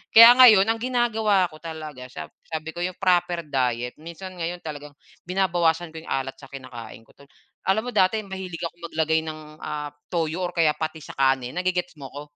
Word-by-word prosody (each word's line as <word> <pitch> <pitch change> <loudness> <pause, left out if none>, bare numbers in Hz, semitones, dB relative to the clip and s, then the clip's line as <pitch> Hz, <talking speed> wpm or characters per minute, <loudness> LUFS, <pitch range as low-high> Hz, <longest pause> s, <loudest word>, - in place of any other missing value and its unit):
Kaya 230 +1 +12
ngayon 215 -6 +9
ang 225 - -2
ginagawa 225 -6 +2
ko 155 - -13
talaga, 155 -6 -7
sab 80 -10 -8 0.2
sabi 160 0 -4
ko 175 - -6
'yong 185 0 -3
proper 175 -2 +2
diet. 125 -3 -1
Minsan 170 +4 -9
ngayon 175 +1 -3
talagang 150 -2 -8 0.3
binabawasan 175 -3 +1
ko 160 - -7
'yong - - -12
alat 135 0 -2
sa - - -12
kinakain 120 -4 -9
ko, - - -22
tol 140 - -18 0.4
Alam 220 +5 +2
mo - - -5
dati 185 +4 +3
mahilig 190 -3 -6
akong 170 0 -6
maglagay 160 0 +1
ng 155 -1 -6 0.2
ah, 150 -1 -5 0.2
toyo 170 +1 -1
or - - -9
kaya 160 -3 +4
patis 160 -1 -5
sa - - -21
kanin. 130 -2 +2
Na-ge-gets 180 0 -1
mo 135 -1 -8
ako, 145 - -7
165 Hz, 195 wpm, -24 LUFS, 145-185 Hz, 0.4 s, Kaya